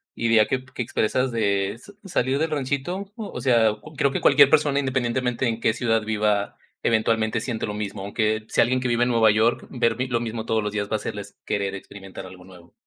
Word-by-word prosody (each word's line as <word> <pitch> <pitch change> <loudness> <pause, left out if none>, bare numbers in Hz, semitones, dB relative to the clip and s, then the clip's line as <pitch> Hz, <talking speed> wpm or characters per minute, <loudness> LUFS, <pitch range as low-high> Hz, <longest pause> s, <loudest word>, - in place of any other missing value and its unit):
idea 115 -2 +3
que 130 0 -2
que 125 -1 -7
expresas 125 +3 0
de 100 -2 0
sa 205 - -14
salir 135 -7 0
del 160 +1 0
ranchito, 150 +7 -3
o 220 -3 -6
o - - -5
sea, 115 -5 +3
co 155 - -13
creo 140 -1 +1
que - - -1
cualquier 140 0 +6
persona, 150 -2 +3
independientemente 125 -2 -1
en 115 0 -2
qué 110 - +2
ciudad 115 -2 +1
viva, 105 -1 0 0.2
eventualmente 110 0 +1
siente 115 -1 -3
lo 105 - -4
mismo. 105 -1 -5
Aunque 110 +1 -1
si - - +2
alguien 130 +2 +2
que 125 - -2
vive 120 0 +2
en 125 - +1
Nueva 115 -2 +4
York, 110 +3 +1
ver 115 -3 +1
mi 130 +3 -2
lo 120 -2 0
mismo 115 -1 -4
todos 110 -1 0
los 105 - -2
días 105 -1 -2
va - - -4
a - - +3
hacerles 105 -1 -7
querer 100 -1 -2
experimentar 95 -1 -10
algo 90 0 -12
nuevo. 90 -2 -16
115 Hz, 225 wpm, -24 LUFS, 105-130 Hz, 0.2 s, cualquier